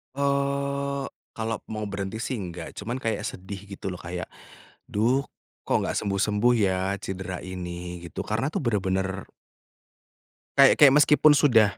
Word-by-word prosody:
Eee, 140 Hz, 0 st, 0 dB, 0.3 s
kalau 110 Hz, -1 st, -2 dB
mau 110 Hz, -1 st, -4 dB
berhenti 100 Hz, +2 st, -4 dB
sih 130 Hz, -1 st, -2 dB
enggak, 85 Hz, -3 st, -6 dB
cuman 115 Hz, +5 st, -3 dB
kayak 115 Hz, -, -1 dB
sedih 95 Hz, +1 st, -7 dB
gitu, 95 Hz, -1 st, -5 dB
loh, 90 Hz, -, -7 dB
kayak, 90 Hz, +1 st, -5 dB, 0.6 s
"Duh, 120 Hz, +7 st, +2 dB, 0.4 s
kok -, -, 0 dB
nggak -, -, -2 dB
sembuh-sembuh 105 Hz, +4 st, +2 dB
ya 95 Hz, -2 st, +2 dB, 0.2 s
cedera 95 Hz, -1 st, -5 dB
ini?" 90 Hz, -1 st, -6 dB
Gitu. -, -, -8 dB
Karena 115 Hz, +8 st, -1 dB
tuh -, -, -1 dB
bener-bener 95 Hz, -5 st, -1 dB, 1.3 s
kayak 135 Hz, -1 st, +8 dB
kayak 140 Hz, -2 st, +9 dB
meskipun 150 Hz, 0 st, +6 dB
sudah 115 Hz, -8 st, +4 dB
105 Hz, 140 wpm, -26 LUFS, 95-135 Hz, 1.3 s, kayak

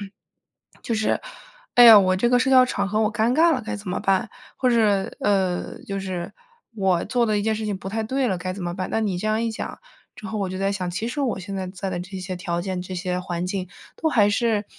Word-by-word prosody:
就 205 Hz, -, -5 dB
是， 195 Hz, -, -12 dB, 1.6 s
哎 245 Hz, -, +8 dB
呀， 225 Hz, -2 st, +11 dB
我 185 Hz, -2 st, +4 dB
这 240 Hz, +5 st, +2 dB
个 245 Hz, -, +4 dB
社 260 Hz, -, +1 dB
交 255 Hz, -1 st, +7 dB
场 200 Hz, -5 st, -2 dB
合 215 Hz, +2 st, 0 dB
我 215 Hz, -1 st, +1 dB
尴 225 Hz, +3 st, +1 dB
尬 330 Hz, +2 st, +5 dB
了 255 Hz, -5 st, -1 dB
该 230 Hz, 0 st, -4 dB
怎 205 Hz, -1 st, -9 dB
么 180 Hz, -, -2 dB
办？ 195 Hz, -1 st, +1 dB, 0.3 s
或 255 Hz, -, +1 dB
者， 240 Hz, -, +3 dB, 0.4 s
呃， 190 Hz, -3 st, 0 dB
就 195 Hz, 0 st, -3 dB
是， 185 Hz, -3 st, -5 dB, 0.4 s
我 190 Hz, -4 st, +1 dB
做 240 Hz, +2 st, +1 dB
了 215 Hz, -2 st, +1 dB
一 205 Hz, -, -1 dB
件 220 Hz, 0 st, +1 dB
事 215 Hz, 0 st, -4 dB
情 205 Hz, -2 st, -2 dB
不 190 Hz, -, -7 dB
太 220 Hz, +3 st, -2 dB
对 260 Hz, +4 st, 0 dB
了 190 Hz, -6 st, 0 dB
该 185 Hz, +1 st, -4 dB
怎 185 Hz, -2 st, -6 dB
么 175 Hz, 0 st, -3 dB
办？ 185 Hz, -1 st, -4 dB
那 -, -, 0 dB
你 200 Hz, -5 st, -1 dB
这 215 Hz, +4 st, -2 dB
样 215 Hz, +1 st, +1 dB
一 -, -, 0 dB
讲 -, -, -6 dB, 0.4 s
之 215 Hz, -, -9 dB
后 220 Hz, 0 st, -4 dB
我 190 Hz, -, -1 dB
就 185 Hz, 0 st, -5 dB
在 195 Hz, +1 st, 0 dB
想， 180 Hz, -3 st, -3 dB
其 220 Hz, +6 st, -3 dB
实 285 Hz, +5 st, -3 dB
我 255 Hz, -7 st, -1 dB
现 195 Hz, +1 st, -7 dB
在 190 Hz, -1 st, -3 dB
在 190 Hz, +1 st, -5 dB
的 180 Hz, -2 st, -3 dB
这 190 Hz, +1 st, -7 dB
些 185 Hz, 0 st, -5 dB
条 175 Hz, -1 st, -3 dB
件、 185 Hz, -1 st, -3 dB
这 185 Hz, 0 st, -6 dB
些 180 Hz, +1 st, -2 dB
环 175 Hz, -1 st, -3 dB
境 185 Hz, -1 st, -3 dB, 0.3 s
都 320 Hz, -, -1 dB
还 210 Hz, -8 st, +4 dB
是， 220 Hz, -1 st, +1 dB
200 Hz, 280 characters per minute, -23 LUFS, 185-225 Hz, 1.6 s, 呀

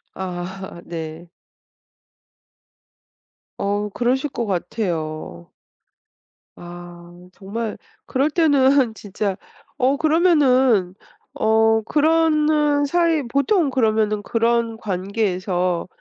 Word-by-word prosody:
아 185 Hz, 0 st, -6 dB
네. 165 Hz, 0 st, -7 dB, 2.3 s
어. 205 Hz, +1 st, -1 dB
그러실 250 Hz, +7 st, 0 dB
거 240 Hz, -3 st, -3 dB
같아요. 165 Hz, -, -4 dB, 1.1 s
아. 175 Hz, 0 st, -11 dB, 0.3 s
정말 215 Hz, +4 st, -5 dB, 0.3 s
그럴 275 Hz, +3 st, 0 dB
때는 280 Hz, -6 st, +3 dB
진짜 200 Hz, -2 st, -3 dB, 0.4 s
어 265 Hz, 0 st, +2 dB
그러면은 265 Hz, -, +3 dB, 0.4 s
어 220 Hz, 0 st, +3 dB
그러는 305 Hz, 0 st, +2 dB
사이 335 Hz, 0 st, +1 dB
보통 280 Hz, -, +1 dB
그러면은 220 Hz, -4 st, +1 dB
그런 230 Hz, 0 st, 0 dB
관계에서 185 Hz, -3 st, -2 dB
225 Hz, 155 characters per minute, -21 LUFS, 185-280 Hz, 2.3 s, 때는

